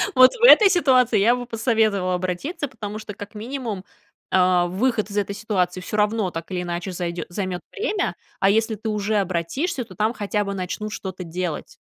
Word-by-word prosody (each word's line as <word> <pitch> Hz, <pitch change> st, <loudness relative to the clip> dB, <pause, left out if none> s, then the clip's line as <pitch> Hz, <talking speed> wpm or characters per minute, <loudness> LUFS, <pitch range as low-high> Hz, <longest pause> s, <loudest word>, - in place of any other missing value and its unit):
Вот 255 Hz, 0 st, +8 dB
в 475 Hz, -, -7 dB
этой 435 Hz, -4 st, +9 dB
ситуации, 265 Hz, -, +4 dB
я 230 Hz, +5 st, +4 dB
бы 245 Hz, 0 st, -5 dB
посоветовала 220 Hz, -5 st, +1 dB
обратиться, 185 Hz, -, -3 dB
потому 215 Hz, -5 st, -7 dB
что, 210 Hz, -1 st, -7 dB
как 205 Hz, +2 st, -10 dB
минимум, 225 Hz, -3 st, -5 dB, 0.5 s
а, 180 Hz, -1 st, +4 dB
выход 215 Hz, +3 st, 0 dB
из 205 Hz, -, -5 dB
этой 200 Hz, 0 st, -1 dB
ситуации 185 Hz, -4 st, -1 dB
всё 210 Hz, +3 st, -4 dB
равно 210 Hz, -1 st, +1 dB
так 165 Hz, +2 st, -7 dB
или 180 Hz, -1 st, -1 dB
иначе 175 Hz, +2 st, -4 dB
зайдё 175 Hz, -1 st, -4 dB
займёт 185 Hz, -1 st, -3 dB
время. 415 Hz, -2 st, -1 dB, 0.2 s
А 195 Hz, -, +4 dB
если 220 Hz, +2 st, +2 dB
ты 220 Hz, +2 st, -5 dB
уже 210 Hz, 0 st, -1 dB
обратишься, 205 Hz, -, -1 dB
то 190 Hz, -4 st, -14 dB
там 215 Hz, +4 st, +1 dB
хотя 205 Hz, -1 st, -1 dB
бы 200 Hz, -, -3 dB
начнут 195 Hz, +3 st, -4 dB
что-то 185 Hz, -1 st, -6 dB
делать. 170 Hz, -1 st, -5 dB
205 Hz, 185 wpm, -23 LUFS, 185-235 Hz, 0.5 s, этой